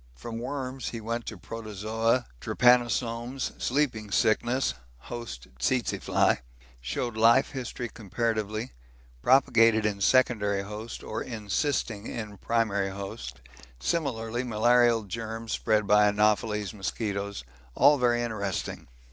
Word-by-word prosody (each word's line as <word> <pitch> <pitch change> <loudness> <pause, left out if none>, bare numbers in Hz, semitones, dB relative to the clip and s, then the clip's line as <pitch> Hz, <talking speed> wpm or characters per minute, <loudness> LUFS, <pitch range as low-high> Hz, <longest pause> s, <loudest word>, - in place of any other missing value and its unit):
From 115 - -6
worms 130 0 -4
he 115 - -5
went 115 +2 -4
to 110 - -5
Protozoa 110 +4 -1
Trypanosomes, 120 - +2
sleeping 125 -6 0
sickness, 120 +5 +2 0.2
host 110 - -8
tsetse 120 - 0
fly - - +2 0.4
showed 110 - -3
life 115 +4 +5
history 125 -3 -4
comparatively, 110 +1 -2 0.5
propagated 115 - +5
in 100 -1 -1
secondary 105 -4 +3
host 105 +3 -7
or 110 - -4
encysting 115 -1 -2
in 105 -3 -6
primary 105 -4 0
host 70 -11 -7 0.4
similarly 120 - -1
malarial 120 0 +3
germs 115 +3 -5
spread 105 -1 +1
by 105 +1 +5
Anopheles 105 0 +1
mosquitoes 100 - -3 0.3
all 145 -1 +6
very 120 -1 +2
interesting. 100 -5 -3
115 Hz, 110 wpm, -28 LUFS, 105-120 Hz, 0.5 s, all